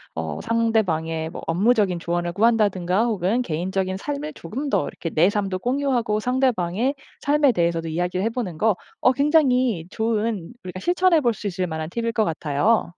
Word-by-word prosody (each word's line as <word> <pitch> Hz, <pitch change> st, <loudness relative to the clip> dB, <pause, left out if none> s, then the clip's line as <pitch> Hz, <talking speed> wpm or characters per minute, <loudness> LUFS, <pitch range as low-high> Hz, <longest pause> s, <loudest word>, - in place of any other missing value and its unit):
어 80 Hz, -2 st, -4 dB
상대방의 170 Hz, -9 st, 0 dB
뭐 -, -, -8 dB
업무적인 195 Hz, 0 st, +2 dB
조언을 175 Hz, 0 st, -2 dB
구한다든가 205 Hz, -3 st, +2 dB
혹은 215 Hz, +2 st, 0 dB
개인적인 185 Hz, +1 st, -2 dB
삶을 290 Hz, +6 st, -4 dB
조금 260 Hz, -, -5 dB
더 -, -, +1 dB
이렇게 165 Hz, -, -5 dB
내 170 Hz, +5 st, +3 dB
삶도 195 Hz, -3 st, -2 dB
공유하고 245 Hz, -3 st, 0 dB
상대방의 250 Hz, -1 st, 0 dB, 0.3 s
삶에 290 Hz, -1 st, +3 dB
대해서도 170 Hz, -3 st, 0 dB
이야기를 180 Hz, +3 st, -1 dB
해보는 225 Hz, -8 st, -3 dB
거 220 Hz, +5 st, +3 dB, 0.3 s
어 255 Hz, -, +5 dB
굉장히 260 Hz, -, +2 dB
좋은, 220 Hz, -2 st, -2 dB
우리가 185 Hz, 0 st, -7 dB
실천해볼 340 Hz, -, +3 dB
수 210 Hz, 0 st, -6 dB
있을 185 Hz, -1 st, -2 dB
만한 160 Hz, 0 st, -4 dB
팁일 230 Hz, +4 st, -2 dB
것 225 Hz, -2 st, +1 dB
같아요. 160 Hz, +7 st, +1 dB
210 Hz, 375 characters per minute, -23 LUFS, 175-245 Hz, 0.3 s, 어